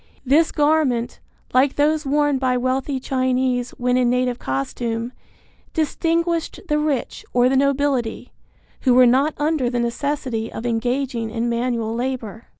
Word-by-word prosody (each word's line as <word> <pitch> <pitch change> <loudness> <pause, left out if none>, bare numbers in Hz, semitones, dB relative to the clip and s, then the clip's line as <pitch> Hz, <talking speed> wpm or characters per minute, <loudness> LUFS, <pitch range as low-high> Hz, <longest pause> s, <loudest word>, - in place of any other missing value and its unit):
This 300 +5 +3
garment, 290 -6 +1 0.3
like 265 +2 +3
those 300 0 +1
worn 290 -1 +2
by 255 -1 +1
wealthy 260 +2 -1
Chinese 255 -1 0
when 250 0 +1
in 250 -1 +3
native 250 0 0
costume, 225 - -3 0.6
distinguished 330 +1 0
the 300 -2 +1
rich 300 -4 -2
or 245 0 +4
the 265 - +2
nobility, 270 -4 0 0.5
who 255 -2 +3
were 255 0 +7
not 270 +5 +3
under 295 -4 0
the 245 0 -1
necessity 235 -1 -2
of 225 - -6
engaging 245 0 -1
in 230 +1 -2
manual 235 -1 -1
labor. 240 -3 -4
255 Hz, 140 wpm, -21 LUFS, 240-285 Hz, 0.6 s, were